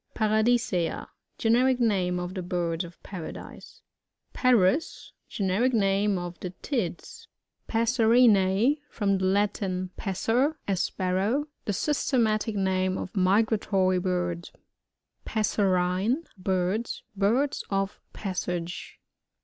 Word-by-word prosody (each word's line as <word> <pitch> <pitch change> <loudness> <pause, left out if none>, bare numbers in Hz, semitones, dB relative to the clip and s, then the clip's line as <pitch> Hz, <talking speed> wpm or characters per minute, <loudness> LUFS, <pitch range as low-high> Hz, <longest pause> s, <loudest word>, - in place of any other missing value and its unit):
Paradis^a. 220 -4 +1 0.2
— - - -51
Generic 250 +3 +3
name 185 -6 +1
of 180 +1 -4
the 190 - -4
Birds 175 -1 -2
of 170 -1 -13
Paradise. 180 -5 -9 0.5
Par 245 -7 +4
us. 295 - -1
— - - -49
Generic 210 +6 +1
name 200 -1 +2
of 175 0 -6
the 180 - -4
Tits. 210 - -4 0.4
Passerin/E. 230 +1 +3
— - - -39
From 200 -3 +1
the 190 - 0
Latin, 190 -2 0
p9s«^r, 230 - 0
a 195 - +1
Sparrow. 190 +10 0 0.2
The 205 - -1
systematic 225 -4 0
name 185 -1 0
of 190 - -6
migratory 195 -1 +2
birds. 175 -2 -2 0.7
Passerine 200 - +1
(Birdn) 190 +3 -1 0.2
— - - -46
Birds 230 +9 +1
of 195 0 -1
passage. 180 -3 -4
195 Hz, 115 wpm, -27 LUFS, 185-225 Hz, 0.7 s, Par